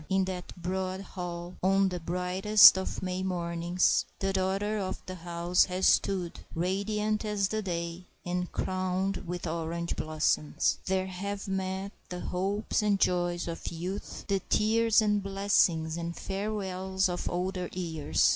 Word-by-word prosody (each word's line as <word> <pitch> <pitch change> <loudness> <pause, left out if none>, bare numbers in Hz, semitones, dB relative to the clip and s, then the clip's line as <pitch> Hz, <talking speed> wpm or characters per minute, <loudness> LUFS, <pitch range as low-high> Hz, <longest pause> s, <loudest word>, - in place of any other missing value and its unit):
In 190 0 +2
that 185 -1 -6
broad 185 +2 -2
hall, 175 -2 -6
on 195 +1 +3
the 180 -1 -4
brightest 180 +5 +6
of 190 0 -3
May 185 0 -2
mornings, 175 -1 +1
the 195 0 -1
daughter 195 +3 0
of 190 -1 -3
the 185 - -6
house 175 0 +1
has 185 +1 -1
stood, 185 -4 +2 0.2
radiant 210 +5 0
as 205 -2 0
the 220 0 -1
day, 170 -2 -4 0.2
and 180 0 -2
crowned 185 +1 -1
with 175 +1 -4
orange 170 +1 -2
blossoms. 155 -1 +1
There 190 0 +1
have 195 +2 -5
met 190 0 -2 0.2
the 180 0 -5
hopes 200 +5 -1
and 205 -2 +2
joys 175 -1 +1
of 165 -1 -5
youth, 180 +4 -5
the 200 -2 +1
tears 225 +1 +4
and 210 -1 +2
blessings 190 -5 +2
and 170 0 -4
farewells 190 -2 -1
of 180 -1 -3
older 180 0 -2
years. 165 -4 +1
185 Hz, 145 wpm, -29 LUFS, 175-195 Hz, 0.2 s, brightest